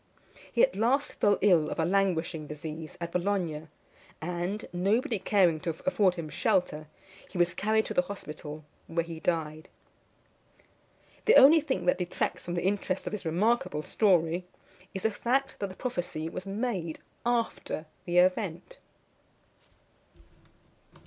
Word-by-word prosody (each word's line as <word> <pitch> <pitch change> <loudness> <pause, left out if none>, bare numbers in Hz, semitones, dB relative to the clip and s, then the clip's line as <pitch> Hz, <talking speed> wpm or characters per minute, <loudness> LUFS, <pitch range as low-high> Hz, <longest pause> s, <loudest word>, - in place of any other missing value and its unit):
He - - +3
at - - +3
last 270 +5 +1
fell 205 -1 +4
ill 170 -7 +5
of - - -4
a 160 - +1
languishing 175 -4 0
disease, 155 +1 -7
at 170 0 -4
Bologna; 175 -4 -1 0.5
and, 180 +5 -3
nobody 205 +5 +1
caring 180 -6 +3
to 175 - -3 0.2
afford 200 -9 +3
him 170 -3 -5
shelter, 155 -1 0 0.4
he 190 - -8
was 175 0 +3
carried 220 +4 +1
to - - -4
the - - +4
hospital, 155 -5 -8 0.2
where 170 0 -1
he 165 -1 -7
died. 160 -2 -2 1.6
The 460 +1 +6
only 305 +4 +9
thing 275 - -2
that 180 - +2
detracts 180 -1 -2
from 175 - -4
the 175 - -1
interest 195 -1 -1
of - - -3
this 205 -5 -4
remarkable 180 -2 +1
story 175 -3 +2 0.4
is 190 - -6
the 220 - +2
fact, 265 +6 0
that 200 - -2
the 185 - -10
prophecy 175 -9 -3
was 180 +3 -7
made 195 -6 -2 0.3
after 235 -8 -1 0.2
the 175 0 0
event. 185 - +1
180 Hz, 140 wpm, -29 LUFS, 165-210 Hz, 1.6 s, only